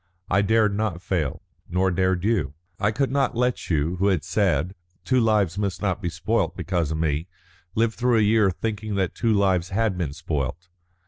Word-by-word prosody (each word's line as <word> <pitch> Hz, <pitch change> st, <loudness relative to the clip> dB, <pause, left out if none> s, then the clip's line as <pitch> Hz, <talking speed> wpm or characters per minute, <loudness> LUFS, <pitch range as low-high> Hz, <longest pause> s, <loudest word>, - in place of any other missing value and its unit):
I 100 Hz, +2 st, +4 dB
dared 105 Hz, 0 st, +3 dB
not 105 Hz, -5 st, -1 dB
fail, 85 Hz, -7 st, -2 dB, 0.3 s
nor 95 Hz, +2 st, +1 dB
dared 95 Hz, 0 st, +1 dB
you. 95 Hz, -, 0 dB, 0.2 s
I 105 Hz, -, +2 dB
could 130 Hz, +5 st, 0 dB
not 135 Hz, -3 st, +1 dB
let 125 Hz, 0 st, 0 dB
you, 80 Hz, +2 st, 0 dB
who 95 Hz, +3 st, +2 dB
had 95 Hz, -6 st, +1 dB
said 90 Hz, -3 st, +1 dB, 0.3 s
'Two 130 Hz, -1 st, +3 dB
lives 105 Hz, -5 st, +2 dB
must 100 Hz, -3 st, -2 dB
not 100 Hz, -1 st, -1 dB
be 90 Hz, -, -1 dB
spoilt -, -, -1 dB
because 85 Hz, -5 st, -1 dB
of 80 Hz, -, -2 dB
me,' 80 Hz, +1 st, -1 dB, 0.5 s
live 115 Hz, 0 st, +2 dB
through 120 Hz, 0 st, +2 dB
a -, -, +4 dB
year 105 Hz, -1 st, +4 dB
thinking 105 Hz, +2 st, -3 dB
that 95 Hz, -3 st, 0 dB
two 115 Hz, -1 st, 0 dB
lives 95 Hz, -4 st, +2 dB
had 100 Hz, -2 st, 0 dB
been 75 Hz, -6 st, -2 dB
spoilt. 75 Hz, +3 st, -4 dB
95 Hz, 190 wpm, -24 LUFS, 85-110 Hz, 0.5 s, I